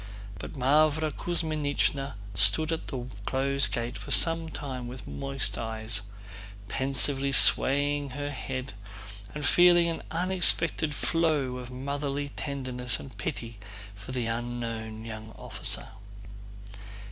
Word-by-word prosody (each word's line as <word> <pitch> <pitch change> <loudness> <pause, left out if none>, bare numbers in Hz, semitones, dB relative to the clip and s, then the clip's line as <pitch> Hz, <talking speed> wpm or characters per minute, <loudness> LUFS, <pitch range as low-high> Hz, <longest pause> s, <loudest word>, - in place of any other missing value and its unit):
But - - -7
Mávra 155 +3 +3
Kuzmínichna 145 -4 0 0.2
stood 155 - +3
at 165 - -3
the 125 -3 -4 0.2
closed 135 +1 +1
gate 120 0 -2
for - - -9
some 165 -1 +4
time 130 -5 -5
with 120 -3 -8
moist 135 -2 -2
eyes, 110 -2 -1 0.7
pensively 135 +2 +2
swaying 145 +1 +4
her 145 0 -3
head 130 -1 -5 0.6
and 150 -1 -3
feeling 175 +1 +6
an 165 - -3
unexpected 170 -3 +2
flow 150 -7 +1
of 125 -1 -7
motherly 140 +2 -3
tenderness 130 -4 -3
and 130 -5 -10
pity 115 +1 -4 0.3
for 100 +4 -10
the 125 -2 -1
unknown 115 -1 -4
young 110 0 -7
officer. - - 0
135 Hz, 115 wpm, -28 LUFS, 120-150 Hz, 0.7 s, feeling